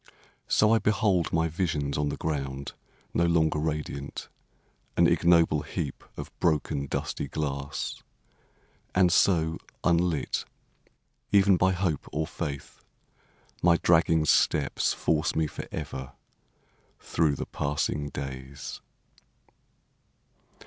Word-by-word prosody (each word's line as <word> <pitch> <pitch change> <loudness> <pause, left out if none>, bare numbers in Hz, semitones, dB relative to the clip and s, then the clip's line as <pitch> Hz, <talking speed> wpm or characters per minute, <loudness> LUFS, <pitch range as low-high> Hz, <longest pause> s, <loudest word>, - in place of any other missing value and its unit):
So 105 +1 +4
I 115 - +4
behold 100 -5 +2
my 80 0 +2
visions 75 -4 -1
on 75 0 0
the - - -4
ground 70 -3 -3 0.4
No 85 - +2
longer 80 -2 +2
radiant, 75 -2 -4 0.7
an - - +6
ignoble 85 -3 +4
heap 75 -1 -5
Of - - -6
broken, 75 -4 0
dusty - - -3
glass. 70 -1 -4 0.9
And 90 -2 +5
so, 80 -4 +3 0.2
unlit, 85 -2 +1 0.9
Even 100 -1 +6
by 95 +1 +3
hope 90 -5 -1
or 75 +3 -1
faith, 75 -4 -6 0.8
my 85 -1 +5
dragging 80 -2 +3
steps 70 -1 +2
Force 80 -1 0
me 80 - +2
forever 65 -3 -6 0.9
through 80 -3 +1
the - - -4
passing 75 0 -2
days. 65 0 -7
80 Hz, 105 wpm, -27 LUFS, 70-85 Hz, 0.9 s, an